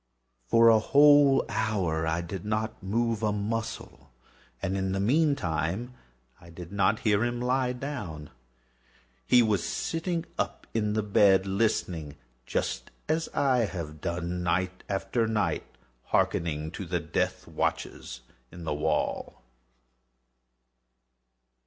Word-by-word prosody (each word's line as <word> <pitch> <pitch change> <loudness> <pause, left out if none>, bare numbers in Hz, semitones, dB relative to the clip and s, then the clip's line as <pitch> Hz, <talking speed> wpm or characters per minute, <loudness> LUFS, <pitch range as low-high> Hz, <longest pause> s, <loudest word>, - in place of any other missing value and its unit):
For 115 - +6
a 110 -1 +6
whole 145 +2 +6
hour 95 -7 -1
I 80 +1 0
did 85 +1 -6
not 110 +1 -2
move 115 +3 0
a 105 -1 +1
muscle, 110 - -4 0.5
and 95 +6 -2
in 95 -1 -1
the 95 - -1
meantime 120 - 0 0.5
I 85 -1 -15
did 85 +1 -10
not 100 +2 +2
hear 105 -1 +2
him 120 0 -1
lie 125 +1 +1
down. 120 - -6 1.0
He 125 -1 +6
was 105 -5 +1
still 165 - -2
sitting 170 -1 -2
up - - -2
in 105 -2 0
the 110 0 0
bed 100 -2 +4
listening;—just 80 - -2 0.2
as 160 +1 0
I 130 -4 +3
have 80 -6 -6
done, 85 +1 -3
night 90 +2 -1
after 100 +4 0
night, 110 -2 -1 0.4
hearkening 80 -2 0
to - - -6
the - - 0
death - - -2
watches 60 0 -3 0.3
in 85 - -10
the 80 - -2
wall. 75 -3 -2
100 Hz, 125 wpm, -28 LUFS, 85-115 Hz, 1.0 s, For